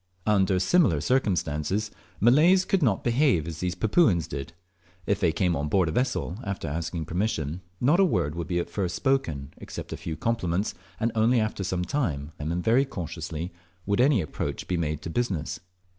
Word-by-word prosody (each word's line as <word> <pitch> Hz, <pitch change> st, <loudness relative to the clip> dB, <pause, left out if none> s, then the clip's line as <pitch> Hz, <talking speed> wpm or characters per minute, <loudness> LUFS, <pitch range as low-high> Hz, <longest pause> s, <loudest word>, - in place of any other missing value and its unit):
Under 95 Hz, -3 st, +3 dB
similar 100 Hz, -, +3 dB
circumstances 95 Hz, -, 0 dB, 0.3 s
Malays 160 Hz, -, +5 dB
could 195 Hz, -, +1 dB
not 110 Hz, -9 st, +2 dB
behave 120 Hz, -, +2 dB
as 80 Hz, -1 st, -6 dB
these 90 Hz, -1 st, -2 dB
Papuans 105 Hz, -, +3 dB
did. 70 Hz, 0 st, -5 dB, 0.5 s
If 100 Hz, 0 st, +1 dB
they 85 Hz, -5 st, +3 dB
came 85 Hz, 0 st, +1 dB
on 75 Hz, 0 st, -1 dB
board 90 Hz, +1 st, +2 dB
a -, -, -2 dB
vessel 120 Hz, -3 st, -1 dB
(after 100 Hz, -5 st, -4 dB
asking 80 Hz, +2 st, -3 dB
permission), 85 Hz, -2 st, -2 dB, 0.2 s
not 150 Hz, +9 st, +3 dB
a -, -, +7 dB
word 90 Hz, -, +1 dB
would 85 Hz, -1 st, -4 dB
be 85 Hz, 0 st, -1 dB
at 85 Hz, -, -1 dB
first 90 Hz, -4 st, -2 dB
spoken, 80 Hz, -, -1 dB
except -, -, -7 dB
a -, -, -5 dB
few 85 Hz, -3 st, -5 dB
compliments, 100 Hz, -4 st, -1 dB, 0.3 s
and 115 Hz, +1 st, +1 dB
only 115 Hz, +2 st, +3 dB
after 110 Hz, -2 st, -1 dB
some 90 Hz, -1 st, -1 dB
time, 80 Hz, -, -2 dB
and 75 Hz, +2 st, -3 dB
very 120 Hz, +4 st, +4 dB
cautiously, 85 Hz, -, -5 dB, 0.3 s
world 100 Hz, +4 st, +2 dB
any 130 Hz, -5 st, +4 dB
approach 75 Hz, -, -4 dB
be 90 Hz, -, 0 dB
made 80 Hz, -3 st, -2 dB
to 80 Hz, -, -5 dB
business. 90 Hz, -6 st, -2 dB
95 Hz, 180 wpm, -26 LUFS, 80-115 Hz, 0.5 s, a